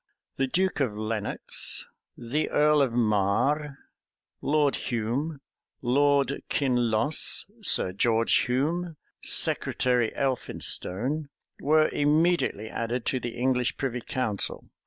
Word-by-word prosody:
The 135 - +1
duke 185 +6 0
of 120 -7 -1
Lenox, 110 -1 -1 0.3
the 135 +7 -2
earl 150 0 +3
of 135 -3 +1
Marre, 120 +7 +1 0.6
Lord 145 -1 +2
Hume, 130 +6 -3 0.4
Lord 140 +2 +2
Kinloss, 125 0 +2 0.2
Sir 135 - +2
George 115 +4 +1
Hume, 160 +6 -1 0.2
Secretary 125 -3 +2
Elphinstone,[] 135 +1 -1 0.3
were 155 +2 +3
immediately 150 - +1
added 115 +2 -3
to 130 - 0
the 120 0 -6
English 125 0 0
privy 125 -3 -3
council. 110 -5 -2
130 Hz, 100 wpm, -26 LUFS, 115-150 Hz, 0.6 s, earl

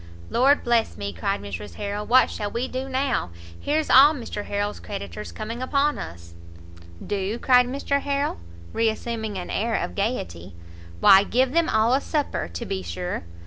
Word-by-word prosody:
"Lord 275 +4 +4
bless 235 - +1
me," 100 0 -4
cried 85 +3 -2
Mrs 100 +1 -7
Harrel, 205 0 -4
"what 255 +1 +5
shall 205 -1 -3
we 235 +4 -2
do 260 +1 -4
now? 260 - 0 0.3
here's 310 +1 0
all 285 +4 +7
Mr 230 -5 -6
Harrel's 205 +1 -2
creditors 205 +1 -7
coming 230 +3 -6
upon 280 +3 +1
us!" 85 0 -9 0.7
"Do?" 205 +2 -2
cried 250 0 +4
Mr 280 +2 -1
Harrel, 280 - -1 0.3
re 225 0 +2
assuming 220 -2 -4
an 180 - -5
air 225 +1 0
of - - -2
gaiety, 90 - -3 0.5
"why 195 0 +8
give 255 +4 +1
them 335 +2 +2
all 220 +2 +3
a 270 - +3
supper, 300 -3 -2
to 85 0 -6
be 95 - -3
sure. 90 0 -4
225 Hz, 170 wpm, -24 LUFS, 195-260 Hz, 0.7 s, why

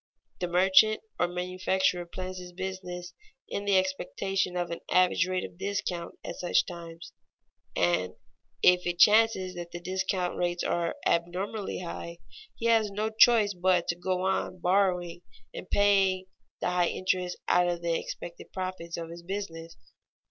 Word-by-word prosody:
The 180 - -1
merchant 190 +5 +5 0.2
or 175 - +3
manufacturer 180 0 0
plans 185 +1 -6
his 180 0 -10
business 180 -1 -6 0.3
in 200 - -4
the 200 -1 +4
expectation 190 0 -1
of 175 -1 -2
an 170 - -4
average 185 0 +3
rate 185 0 -1
of 170 - -12
discount 190 -3 -3
at - - -6
such 175 - +2
times, 170 -1 -9 0.6
and 90 +1 +1 0.5
if 180 0 +5
it 175 0 -1
chances 210 -2 +5
that 175 -1 -7
the 175 - -6
discount 185 0 -1
rates 175 0 -1
are 170 -1 -1
abnormally 185 +5 -1
high, 170 -1 -6 0.4
he 230 - -6
has 225 -2 +4
no 210 +2 -2
choice 220 -2 +5
but 180 -1 +2
to 170 - +1
go 185 +1 -2
on 190 -1 -1
borrowing 180 -1 +1 0.3
and - - -8
paying 195 -2 +3 0.4
the - - 0
high 180 -1 +2
interest 185 0 -1
out 180 0 +4
of 175 -1 -2
the 170 -1 +1
expected 170 +1 -6
profits 185 -3 -5
of 165 -1 -6
his 170 0 -9
business. 170 -3 -6
180 Hz, 155 wpm, -28 LUFS, 175-190 Hz, 0.6 s, merchant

